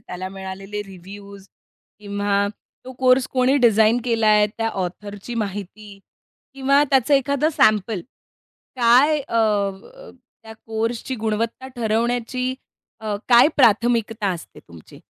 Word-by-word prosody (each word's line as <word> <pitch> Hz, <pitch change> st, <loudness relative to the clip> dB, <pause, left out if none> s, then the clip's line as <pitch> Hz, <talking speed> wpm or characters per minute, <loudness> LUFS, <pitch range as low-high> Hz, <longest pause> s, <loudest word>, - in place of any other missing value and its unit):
त्याला 185 Hz, +1 st, -7 dB
मिळालेले 195 Hz, +2 st, -7 dB
रिव्ह्यूज 195 Hz, +1 st, -12 dB, 0.5 s
किंवा 200 Hz, -1 st, -1 dB, 0.4 s
तो 260 Hz, -, -9 dB
कोर्स 255 Hz, 0 st, +3 dB
कोणी 260 Hz, +2 st, +2 dB
डिझाइन 225 Hz, -2 st, +4 dB
केलाय, 215 Hz, -3 st, +3 dB
त्या 225 Hz, +2 st, -3 dB
ऑथरची 205 Hz, +3 st, -6 dB
माहिती 200 Hz, +1 st, -9 dB, 0.6 s
किंवा 275 Hz, +2 st, +3 dB
त्याचं 270 Hz, +1 st, +3 dB
एखादं 280 Hz, +2 st, +1 dB
सॅम्पल? 215 Hz, -1 st, +2 dB, 0.8 s
काय 255 Hz, +6 st, +4 dB
अ, 230 Hz, -, -2 dB
अ, 215 Hz, -, -2 dB, 0.3 s
त्या 220 Hz, 0 st, -11 dB
कोर्सची 225 Hz, +3 st, -3 dB
गुणवत्ता 225 Hz, +4 st, -3 dB
ठरवण्याची 240 Hz, +3 st, -1 dB, 0.5 s
अ, 215 Hz, -2 st, -3 dB
काय 245 Hz, +4 st, +7 dB
प्राथमिकता 225 Hz, -3 st, +2 dB
असते 170 Hz, -, -10 dB
तुमची? 85 Hz, -2 st, -15 dB
220 Hz, 110 wpm, -21 LUFS, 200-250 Hz, 0.8 s, काय